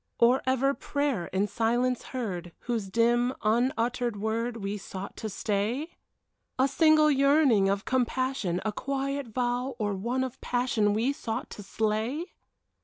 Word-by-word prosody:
Or 245 +3 +4
ever 265 +1 +2
prayer 280 -12 -1
in 190 +2 0
silence 240 +3 0
heard, 180 -9 -4
Whose 230 -5 -2
dim, 240 +4 +2
unuttered 235 0 +1
word 230 +3 -1
We 200 -1 -3
sought 190 +1 -7
to 220 - -4
stay? 215 - -1 0.7
A 260 +1 +4
single 310 +1 +5
yearning 275 -7 +4
of 200 +1 -1
compassion. 255 -7 0
A 215 - +1
quiet 275 +3 -3
vow 245 +3 -1
or 210 -3 -1
one 235 +7 -1
of 260 -2 -6
passion 240 -4 +1
We 240 +6 +1
sought 230 -3 -4
to - - -8
slay? 220 - -2
240 Hz, 140 wpm, -28 LUFS, 210-260 Hz, 0.7 s, single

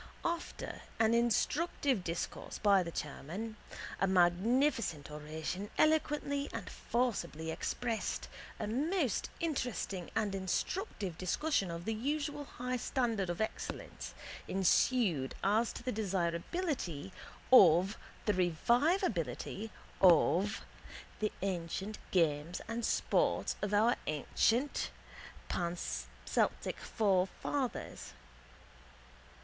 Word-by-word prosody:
After 340 0 -3 0.2
an 225 0 +4
instructive 240 - +2
discourse 165 -1 -4
by 200 -2 +5
the 170 - -3
chairman, 170 +8 -5 0.4
a 195 - +3
magnificent 190 - +2
oration 155 +6 -4
eloquently 295 -2 +2
and - - -5
forcibly 170 -10 -1
expressed, 230 +6 -2 0.3
a - - -1
most 280 - 0
interesting 250 - -2
and 215 -3 +1
instructive 195 - -2
discussion 195 - +1
of 170 +1 -5
the 225 - 0
usual 290 +5 -2
high 250 -1 -3
standard 230 -6 0
of 175 +4 -2
excellence 220 - -4 0.3
ensued 190 - +2
as 220 +4 +3
to - - -8
the 250 - -1
desirability 190 - -2 0.4
of 185 -2 +8 0.3
the 210 - +3
revivability 200 - +1 0.3
of 185 +3 +5 0.6
the 215 -1 0
ancient 190 +2 -3
games 165 -1 +1
and 230 +1 -3
sports - - +1
of 205 - -1
our 220 +4 +4
ancient 225 - +1 0.6
Panceltic 175 0 -2
forefathers. 195 - -1
205 Hz, 95 wpm, -34 LUFS, 175-250 Hz, 0.6 s, of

